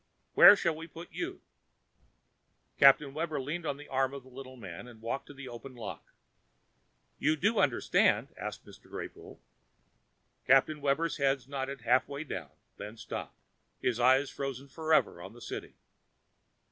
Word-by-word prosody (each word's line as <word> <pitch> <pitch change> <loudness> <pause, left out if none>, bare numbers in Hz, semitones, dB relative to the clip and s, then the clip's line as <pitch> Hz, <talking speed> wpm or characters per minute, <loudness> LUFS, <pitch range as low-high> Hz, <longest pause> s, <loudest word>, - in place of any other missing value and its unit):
Where - - +10
shall 170 -5 0
we 165 +1 -8
put 170 +1 -11
you?" 360 +2 -5 1.4
Captain 140 0 +6
Webber 155 -1 -2
leaned 155 +5 -4
on 140 - -2
the 150 - -11
arm 135 +1 0
of 140 - -8
the 130 - -16
little 130 0 -10
man 95 0 -9
and 120 -3 -13
walked 115 +5 -4
to - - -11
the 135 -1 -9
open 125 +2 -9
lock. 115 -4 -7 1.2
"You 155 +2 +2
do 205 +8 +1
understand?" 135 -4 +3
asked - - -6
Mr. - - -16
Greypoole. - - -8 1.1
Captain 135 +3 +4
Webber's 145 +4 +1
head 135 -3 +1
nodded 135 -1 -4
halfway 130 +5 +1
down, 90 - -6 0.3
then 105 +3 -8
stopped; - - -7 0.4
and - - -1
his 120 -1 -2
eyes 130 +3 +4
froze 135 0 -5
forever 160 - +2
upon 95 +4 -9
the 120 - -14
City. - - -7
135 Hz, 155 wpm, -31 LUFS, 125-150 Hz, 1.4 s, Where